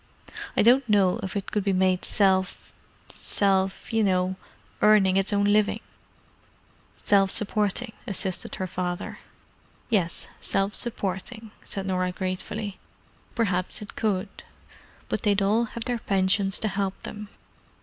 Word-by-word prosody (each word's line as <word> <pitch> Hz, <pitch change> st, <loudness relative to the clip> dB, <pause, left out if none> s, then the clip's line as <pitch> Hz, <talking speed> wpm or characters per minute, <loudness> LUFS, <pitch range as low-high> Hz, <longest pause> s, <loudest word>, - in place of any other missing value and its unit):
I -, -, +5 dB
don't 245 Hz, +2 st, +5 dB
know 195 Hz, -3 st, +3 dB
if 190 Hz, -, -5 dB
it 200 Hz, -, -3 dB
could 210 Hz, -, 0 dB
be 195 Hz, -1 st, +1 dB
made 185 Hz, -1 st, +2 dB
self—self—you 195 Hz, +2 st, 0 dB
know—earning 190 Hz, +1 st, +1 dB
its 195 Hz, +1 st, +1 dB
own 200 Hz, 0 st, +2 dB
living——" 210 Hz, 0 st, +3 dB, 1.2 s
"Self 195 Hz, -1 st, +4 dB
supporting," 210 Hz, +2 st, 0 dB
assisted 190 Hz, -2 st, -1 dB
her 190 Hz, -, -3 dB
father. 180 Hz, -1 st, -4 dB, 0.7 s
"Yes, 180 Hz, -6 st, 0 dB, 0.2 s
self 195 Hz, +1 st, 0 dB
supporting," 220 Hz, 0 st, -3 dB
said 195 Hz, -1 st, -4 dB
Norah 185 Hz, -1 st, 0 dB
gratefully. 195 Hz, +3 st, -4 dB, 0.6 s
"Perhaps 185 Hz, -3 st, -1 dB
it 205 Hz, -, -10 dB
could. 200 Hz, -2 st, -2 dB, 0.7 s
But -, -, -2 dB
they'd 205 Hz, -2 st, +2 dB
all 215 Hz, +4 st, +3 dB
have 230 Hz, 0 st, -6 dB
their 245 Hz, -1 st, -1 dB
pensions 195 Hz, -1 st, +1 dB
to 220 Hz, -, +2 dB
help 195 Hz, -1 st, -2 dB
them." 210 Hz, -1 st, -7 dB
195 Hz, 120 wpm, -26 LUFS, 190-210 Hz, 1.2 s, I